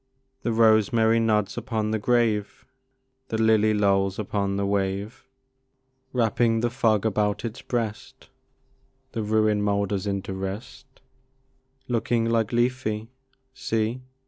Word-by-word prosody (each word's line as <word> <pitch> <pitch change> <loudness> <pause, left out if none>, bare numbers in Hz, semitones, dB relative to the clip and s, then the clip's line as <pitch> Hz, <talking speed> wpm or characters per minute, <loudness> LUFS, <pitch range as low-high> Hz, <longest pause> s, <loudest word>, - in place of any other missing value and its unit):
The 120 - -1
rosemary 110 0 +4
nods 105 -1 +1
upon 110 -3 -2
the 110 - 0
grave; 110 -3 0 0.6
The 110 - -2
lily 110 -1 +4
lolls 100 -2 +2
upon 100 -1 -2
the 100 0 -1
wave; 100 +2 -2 0.8
Wrapping 115 -1 +1
the 120 0 0
fog 115 -5 +1
about 105 0 0
its 115 +1 -6
breast, 115 -4 -4 0.8
The 115 - -3
ruin 110 0 +2
moulders 100 -1 0
into 100 -1 -3
rest; 95 +7 -6 1.0
Looking 115 -1 0
like 115 -2 +1
Lethe, 120 -2 -1 0.4
see! 115 0 -2
110 Hz, 115 wpm, -25 LUFS, 100-115 Hz, 1.0 s, rosemary